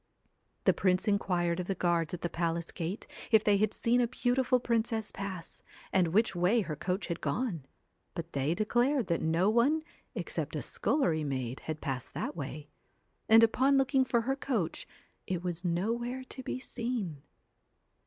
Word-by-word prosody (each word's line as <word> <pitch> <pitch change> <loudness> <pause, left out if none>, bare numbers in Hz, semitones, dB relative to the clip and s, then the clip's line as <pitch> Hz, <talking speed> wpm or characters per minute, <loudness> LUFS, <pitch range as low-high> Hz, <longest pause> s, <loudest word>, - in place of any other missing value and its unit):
The - - +5
prince 185 +2 +1
inquired 180 -4 +1
of 180 - -3
the 195 - -1
guards 170 -3 +1
at 175 - -10
the - - 0
palace 170 0 -2
gate 175 +4 -4 0.2
if 220 -2 +5
they 205 -1 +4
had 215 +1 +2
seen 240 +3 +2
a 240 - +2
beautiful 250 +1 +2
princess 225 -2 0
pass, 190 -4 -6 0.3
and 185 -2 +4
which 195 +4 +2
way 180 +7 +3
her 160 -6 -4
coach 180 +5 -2
had 170 - -4
gone; 165 - -2 0.5
but 170 0 -6
they 140 +4 +1
declared 240 +5 +2
that 170 -2 0
no 165 +4 +2
one 280 +8 +3 0.3
except - - -3
a - - -2
scullery 165 - +1
maid 130 -3 -3
had 155 -1 -4
passed 130 -4 -4
that - - -3
way; 150 0 -6 0.6
and 225 +1 +8
upon 265 +5 +4
looking 270 0 +3
for 240 -2 +1
her 270 +4 0
coach, 235 - -2 0.4
it 180 -2 -2
was 175 -1 -3
nowhere 230 +9 -1
to 260 - -7
be 255 - -3
seen. 230 - -3
195 Hz, 170 wpm, -31 LUFS, 170-235 Hz, 0.6 s, and